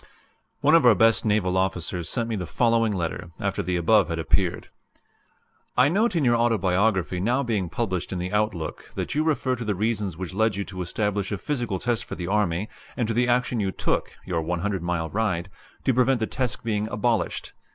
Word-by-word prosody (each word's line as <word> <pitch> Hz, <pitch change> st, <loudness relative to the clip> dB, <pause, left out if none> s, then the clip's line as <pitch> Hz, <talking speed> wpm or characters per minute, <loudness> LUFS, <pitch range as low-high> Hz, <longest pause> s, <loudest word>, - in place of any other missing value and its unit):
[*] -, -, -36 dB
[*] -, -, -47 dB
One 150 Hz, +3 st, +4 dB
of 165 Hz, -, +6 dB
our 120 Hz, -3 st, +7 dB
best 115 Hz, +5 st, +4 dB
naval 105 Hz, -4 st, +2 dB
officers 90 Hz, -2 st, -1 dB
sent 115 Hz, -3 st, -1 dB
me 115 Hz, -, -2 dB
the 90 Hz, -4 st, -4 dB
following 115 Hz, -2 st, +2 dB
letter, 85 Hz, -4 st, -3 dB
after -, -, -1 dB
the 90 Hz, -, -1 dB
above 95 Hz, +3 st, +4 dB
had 80 Hz, -, -2 dB
appeared: 85 Hz, +2 st, 0 dB, 1.1 s
"I -, -, +6 dB
note 210 Hz, +4 st, +2 dB
in 155 Hz, -5 st, +2 dB
your 120 Hz, -1 st, +4 dB
Autobiography 100 Hz, -5 st, +1 dB
now 120 Hz, +8 st, +1 dB
being 105 Hz, -8 st, -1 dB
published 95 Hz, -6 st, -2 dB
in 95 Hz, -, -2 dB
the 90 Hz, +3 st, -4 dB
Outlook 105 Hz, -6 st, -2 dB
that -, -, -3 dB
you 150 Hz, -, +1 dB
refer 140 Hz, -5 st, +1 dB
to 120 Hz, -, -4 dB
the 105 Hz, -2 st, -1 dB
reasons 105 Hz, -3 st, -1 dB
which 95 Hz, 0 st, -5 dB
led 110 Hz, +1 st, +2 dB
you 100 Hz, -, -2 dB
to 95 Hz, -2 st, -7 dB
establish 100 Hz, +2 st, -1 dB
a 105 Hz, -, -1 dB
physical 120 Hz, -6 st, -2 dB
test 120 Hz, +3 st, -1 dB
for -, -, -6 dB
the 90 Hz, -, -5 dB
Army, 95 Hz, -1 st, 0 dB, 0.3 s
and 120 Hz, -4 st, 0 dB
to -, -, +1 dB
the 125 Hz, +2 st, +2 dB
action 125 Hz, -1 st, +1 dB
you 100 Hz, -2 st, 0 dB
took -, -, -2 dB
(your 85 Hz, -3 st, -1 dB
100 90 Hz, +4 st, -2 dB
mile 85 Hz, -2 st, -2 dB
ride) 95 Hz, -4 st, -1 dB, 0.3 s
to 130 Hz, -, +2 dB
prevent 125 Hz, +1 st, +3 dB
the 110 Hz, -, +1 dB
test 125 Hz, +1 st, -2 dB
being 105 Hz, -2 st, -1 dB
abolished. 110 Hz, +1 st, -1 dB
105 Hz, 210 wpm, -25 LUFS, 90-120 Hz, 1.1 s, our